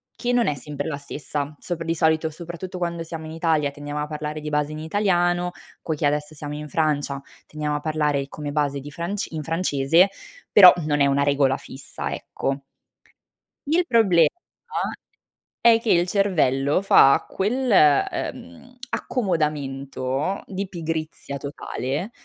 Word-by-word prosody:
che 245 0 -1
non 240 -1 +3
è 145 - +1
sempre 145 +2 -5
la 145 - -3
stessa 145 +1 -5
sopra 170 -2 -4
di 165 0 0
solito, 160 0 +2
soprattutto 170 +3 -7
quando 170 -1 -2
siamo 160 -1 -7
in 155 - -7
Italia 160 -3 +1
tendiamo 145 +1 -5
a 150 - -3
parlare 150 0 -5
di 150 - -4
base 150 0 0
in 155 - -6
italiano, 175 0 +1 0.3
poiché 155 -2 -2
adesso 150 +1 0
siamo 145 0 -6
in 150 0 -6
Francia, 145 -3 0 0.3
tendiamo 150 -1 -3
a - - -1
parlare 150 -2 0
come 145 0 -6
base 145 -1 0
di 145 - -9
franc 175 +6 -4
in 155 -2 -4
francese, 165 +2 +3 0.4
però 185 -3 +10
non 145 -1 +1
è 140 - +6
una 140 0 +2
regola 140 -2 +3
fissa, 135 - -7
ecco. 135 0 -3 1.1
Il 350 +2 +3
problema 200 - +5 1.3
è 230 -1 +6
che 230 - -5
il 175 +1 +4
cervello 155 -7 +2
fa 140 -8 +6
quel, 245 +6 -1
ehm, 150 - +1
accomodamento 145 - -2
di 195 0 -4
pigrizia 160 -4 -4
totale, 140 - -4
155 Hz, 150 wpm, -23 LUFS, 145-175 Hz, 1.3 s, però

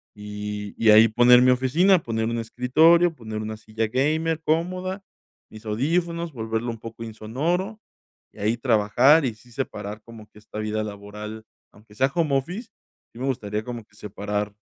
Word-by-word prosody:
y 105 0 -6
y 110 -1 +5
ahí 110 +2 +8
poner 120 +2 +6
mi 125 - +5
oficina, 160 +9 +3
poner 110 -1 -2
un 115 +1 -2
escritorio, 160 +9 +3
poner 110 -3 -6
una 110 0 -5
silla 110 0 -3
gamer 155 +6 0
cómoda, 185 +4 -1 0.5
mis 110 +1 -13
audífonos, 165 +9 -1
volverlo 115 0 -3
un 115 - -7
poco 115 0 -9
insonoro, 155 - -3 0.5
y - - -22
ahí 110 +3 +1
trabajar 125 +6 +4
y 120 - -1
sí 120 +2 -21
separar 105 -4 -5
como 115 -2 -13
que - - -22
esta 105 0 -9
vida 110 0 -2
laboral, 105 +1 -8 0.3
aunque 105 0 -20
sea 135 +4 +2
home 155 -5 +2
office, 180 - -5 0.4
sí - - -15
me 130 - -2
gustaría 105 -5 -2
como 120 -2 -6
que - - -28
separar 105 0 -4
115 Hz, 165 wpm, -24 LUFS, 110-150 Hz, 0.5 s, ahí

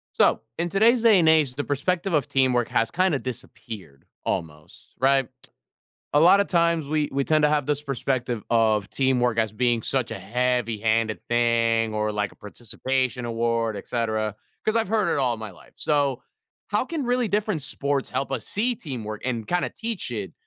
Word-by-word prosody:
So, - - +3 0.2
in 175 +1 0
today's 225 +6 +4
day 225 -3 +6
and 170 -3 +3
age, 155 -5 +4
the 145 - -2
perspective 175 +7 -1
of 145 -5 +2
teamwork 125 -3 +2
has 115 - 0
kinda 185 -4 +2
disappeared, 115 - -9 0.2
almost, 75 -2 -5
right? 135 0 +3 0.9
A 145 - +5
lotta 195 +5 +6
times, 170 -4 +1
we 150 0 0
we 140 0 0
tend 155 +2 +2
to 150 - +4
have 150 -2 +1
this 145 0 0
perspective 130 -4 -2
of 110 -4 +3
teamwork 125 -3 +1
as 110 -2 0
being 120 +1 +1
such 130 +1 -1
a - - -5
heavy-handed 115 -1 0
thing 115 -1 +2
or 105 0 0
like 105 -1 -2
a - - -19
participation 125 +4 -3
award, 115 -1 0
etcetera, 110 0 -2 0.3
'cause 215 - 0
I've 225 -3 +2
heard 215 -2 +1
it - - +1
all 125 -4 +1
my 110 -1 -7
life. 90 - -17
So, 140 -4 0 0.5
how 210 +4 0
can 310 +1 -3
really 245 -1 +1
different 205 -7 -1
sports 140 -1 -1
help 135 +2 -2
us 125 -5 -3
see 240 +4 0
teamwork 115 - -6
and 120 -4 -2
kinda 180 0 0
teach 225 - -3
it 105 -5 -5
130 Hz, 175 wpm, -24 LUFS, 115-155 Hz, 0.9 s, day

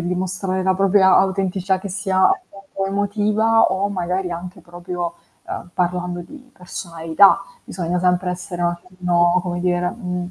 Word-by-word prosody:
e - - -3
dimostrare 185 +1 -2
la 190 0 +2
propria 190 0 +4
autenticità 190 0 +1
che 200 - -7
sia 190 0 -1
appunto, 195 - -4
emotiva 210 +3 +2
o 195 +2 0
magari 185 -1 -2
anche 180 +2 -7
proprio, 175 0 -5 0.3
uhm, 175 - -6
parlando 180 0 -1
di 260 - -13
personalità. 175 -2 +2 0.3
Bisogna 175 -1 -2
sempre 180 0 +1
essere 180 0 -6
un 175 - +3
attimino, 175 0 +1
come 175 -1 -3
dire, 180 0 +1
mhmm, 180 -5 -5
180 Hz, 145 wpm, -20 LUFS, 175-195 Hz, 0.3 s, propria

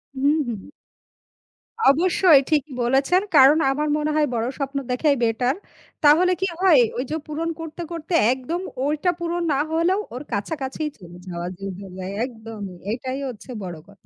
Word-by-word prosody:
হুম, 285 +3 +2
হুম। 220 -5 -5 1.3
অবশ্যই 335 -1 +5
ঠিকই 300 -2 +1
বলেছেন 275 +9 +3 0.2
,কারন 280 +3 +7
আমার 300 +2 -1
মনে 305 0 -1
হয় 305 -1 +3
বড় 225 - 0
স্বপ্ন 275 0 -3
দেখাই 280 +3 +2
বেটার। 245 +4 +1 0.5
তাহলে 335 +5 +6
কি 380 - +2
হয় 335 -9 +6 0.2
ওই 250 - 0
যে - - 0
পূরন 320 +2 -3
করতে, 325 +1 -7
করতে 335 +1 -5 0.2
একদম 265 +7 -4 0.2
ওইটা 305 +5 +1
পুরন 345 0 -2
না 270 - +1
হলেও 340 +5 +2
ওর 250 +3 -6
কাছাকাছি 265 +7 -3 0.2
চলে 175 -2 -13
যাওয়া 175 -1 -4
যায়। 195 +1 -5
হলেও 185 -1 -7 0.2
একদমই 220 -6 -8 0.2
এটাই 255 +3 -3
হচ্ছে 250 0 -9
বড় 175 -3 -6
কথা। 200 0 -21
275 Hz, 160 wpm, -23 LUFS, 230-320 Hz, 1.3 s, কারন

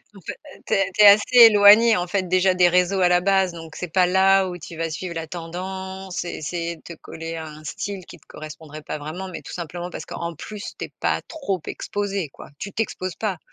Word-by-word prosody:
En 195 - -13
fait, - - -6 0.3
tu - - -2
es 195 -1 +2
tu 210 +3 +4
es - - +10
assez 210 +5 +6
éloigné, 210 +2 +7
en 180 -2 -2
fait, 185 0 -1
déjà 185 +1 +3
des 180 -1 +5
réseaux 180 +2 +2
à 180 - +4
la 180 0 +3
base, 190 -1 +2
donc 165 -1 -10
c'est 175 -3 -6
pas 180 -1 +4
là 190 +1 +4
où 180 -1 -6
tu 170 0 -10
vas 165 0 -2
suivre 170 +3 -5
la 165 -1 -5
tendance 190 +3 -6
et 175 - -4
essayer 170 +2 -4
de - - -22
te 170 - -10
coller 165 0 -8
à 160 -1 -6
un 155 0 -11
style 195 +5 -5
qui 175 - -12
te - - -27
correspondrait 155 0 -10
pas - - -5
vraiment, 155 +6 -6
mais 180 - -7
tout - - -9
simplement 175 +1 -6
parce - - -7
qu'en 170 0 -5
plus 205 +6 -8
tu - - -3
es - - -15
pas - - 0
trop 275 - -3
exposé, 200 -5 -3
quoi, - - -13
tu 200 - -6
t'exposes 185 -4 -3
pas. 200 -6 -3
180 Hz, 240 wpm, -23 LUFS, 165-195 Hz, 0.3 s, es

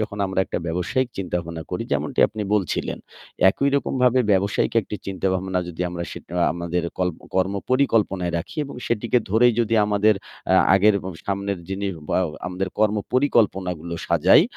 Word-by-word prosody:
যখন 105 -1 -3
আমরা 95 0 0
একটা - - -3
ব্যবসায়িক 90 +10 -1
চিন্তাভাবনা 85 -3 -3
করি, - - -2
যেমনটি - - 0
আপনি 110 - -5
বলছিলেন, 95 -6 -1 0.5
একইরকমভাবে 130 0 +2
ব্যবসায়িক 100 +2 +1
একটি 105 0 -6
চিন্তাভাবনা 95 -1 -1
যদি 85 0 -8
আমরা 85 0 -4
সেটা 85 - -9 0.2
আমাদের 85 0 -2 0.2
কল্প 90 -3 -1 0.2
কর্ম 95 +1 +1 0.2
পরিকল্পনায় 105 -9 +2
রাখি 85 - -8
এবং 140 - -9
সেটিকে 120 +1 +1
ধরেই 120 +4 +5
যদি 115 0 +1
আমাদের 105 +1 +3 0.3
অ্যা 95 - +5 0.2
আগের 105 +2 +5
এবং 95 - -6
সামনের 100 -1 -2
যিনি 95 +1 -3 0.2
বাও 90 -2 +2 0.2
আমাদের 95 +1 -3
কর্ম 110 0 +3 0.2
পরিকল্পনাগুলো 95 - +1
সাজাই 85 - +5
95 Hz, 150 wpm, -23 LUFS, 90-110 Hz, 0.5 s, ধরেই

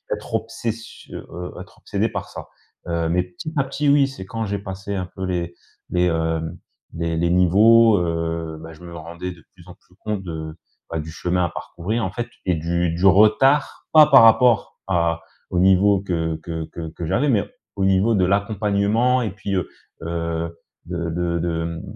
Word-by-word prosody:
être - - -11
obsession 115 0 -5
heu, 90 +1 -6
être - - -14
obsédé - - -1
par - - -5
ça. - - -9 0.4
Heu, 85 -1 -1
mais 90 +2 +2
petit 90 - -8
à 135 - +2
petit 140 +2 -1
oui, 140 -1 +5
c'est 135 -9 -9
quand 115 +3 -4
j'ai 100 0 -2
passé 95 +1 -6
un 90 -1 -3
peu 95 - -3
les 85 -2 -2 0.4
les, 90 0 +2
hem, 80 -1 -1 0.4
les 85 -1 -2
les 85 +1 +1
niveaux, 105 +5 +6
heu, 85 -1 -2
bah 80 0 -9
je 80 +2 -15
me 85 -1 -9
rendais 85 +3 -6
de 85 -2 -19
plus 90 -2 -18
en 90 - -10
plus 90 - -28
compte 105 -3 -3
de, 80 -3 -6 0.3
bah, 80 - -3
du 80 +1 -6
chemin 90 +2 -1
à - - -2
parcourir 105 +8 -3
en 95 - -3
fait 120 +4 -4 0.2
et 90 - +2
du 85 +1 0
du 85 +3 -1
retard, 110 +9 +4
pas 155 -1 +9
par 135 -5 +8
rapport 115 0 +4
à, 85 -3 +1 0.3
au 90 - 0
niveau 95 +2 +5
que 80 -4 -2
que 80 -1 -5
que 85 -1 -6
que 85 - -5
j'avais 135 - +1
mais 110 -8 +3 0.3
au 100 - -1
niveau 95 +4 +3
de 95 - +2
l'accompagnement 105 +5 +1
et 110 -5 -2
puis, 100 0 -4
heu, 90 - -1 0.4
heu, 85 0 -3 0.3
de 85 -1 -3
de 85 0 -1
de, 85 -1 -1
hem, 85 0 -4
90 Hz, 195 wpm, -22 LUFS, 85-105 Hz, 0.4 s, pas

